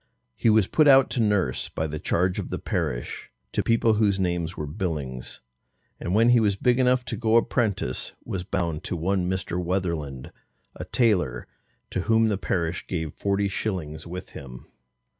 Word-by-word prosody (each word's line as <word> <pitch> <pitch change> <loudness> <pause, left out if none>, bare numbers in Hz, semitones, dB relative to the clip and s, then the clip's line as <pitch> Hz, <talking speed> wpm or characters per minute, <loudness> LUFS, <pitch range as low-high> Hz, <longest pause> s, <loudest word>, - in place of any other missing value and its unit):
He 115 - +2
was 110 -2 +5
put 155 - +3
out 135 -1 +7
to - - -1
nurse 100 - +1
by 80 - -2
the 75 -1 -4
charge 90 +4 0
of - - -5
the - - -2
parish, - - -3 0.2
to - - 0
people 115 -1 +3
whose 105 -2 +2
names 85 -1 -1
were 75 - -3
Billings, 75 -7 -4 0.6
and 90 - -2
when 115 +2 +5
he 120 -1 +6
was 105 -3 +2
big 125 +5 +2
enough 125 -1 +3
to - - -3
go 115 -1 +1
apprentice, 110 - +1
was 90 -2 -3
bound 85 -5 -2
to - - -2
one 90 +2 0
Mr. 90 -1 -2
Wetherland, 85 -7 -2 0.4
a - - -6
tailor, 90 - +1 0.5
to 95 - -1
whom 110 +2 +3
the 100 - 0
parish 85 -3 -2
gave 80 -5 -3
forty 100 0 0
shillings 85 -6 -4
with 90 +2 -7
him. 65 -4 -10
95 Hz, 175 wpm, -25 LUFS, 80-110 Hz, 0.6 s, out